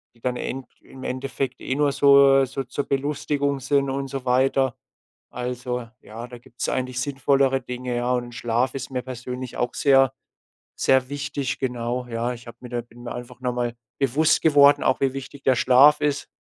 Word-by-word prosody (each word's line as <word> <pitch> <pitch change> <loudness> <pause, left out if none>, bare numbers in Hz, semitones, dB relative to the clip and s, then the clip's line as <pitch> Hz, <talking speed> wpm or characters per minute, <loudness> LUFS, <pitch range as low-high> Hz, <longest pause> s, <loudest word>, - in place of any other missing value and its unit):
die - - -24
dann 125 -1 -1
End 130 0 -5
im 130 -1 -13
Endeffekt 135 +1 -3
eh 130 - -2
nur 145 0 +2
so 140 -1 +6
so 135 +1 -4
zur 140 +3 -3
Belustigung 140 0 -1
sind 140 +1 +1
und 135 0 -3
so 135 -1 -5
weiter. 130 0 +2 0.6
Also, 125 0 -4
ja, 115 +3 -9
da 125 - -10
gibt's 125 0 -6
eigentlich 130 -1 -2
sinnvollere 135 0 +1
Dinge, 125 0 -5
ja. 120 +1 0
Und 120 -1 -3
Schlaf 120 +2 0
ist 135 0 -5
mir 125 -1 -3
persönlich 125 0 -7
auch 120 - -1
sehr, 135 -2 +4 0.6
sehr 130 0 +2
wichtig, 140 -1 -3
genau, 125 -1 -2
ja? 120 +1 -2
Ich 120 0 -12
habe 115 - -11
mir 125 - -9
da 120 -1 -2
bin 120 +1 -16
mir 120 - -5
einfach 125 0 -9
noch 125 -1 -1
mal 120 -1 -2 0.2
bewusst 155 +4 +2
geworden, 145 -2 +6
auch, 130 - +2
wie 135 -1 +2
wichtig 135 +1 -8
der 130 - +4
Schlaf 135 +5 +6
ist, 145 -1 -1
130 Hz, 185 wpm, -23 LUFS, 125-140 Hz, 0.6 s, so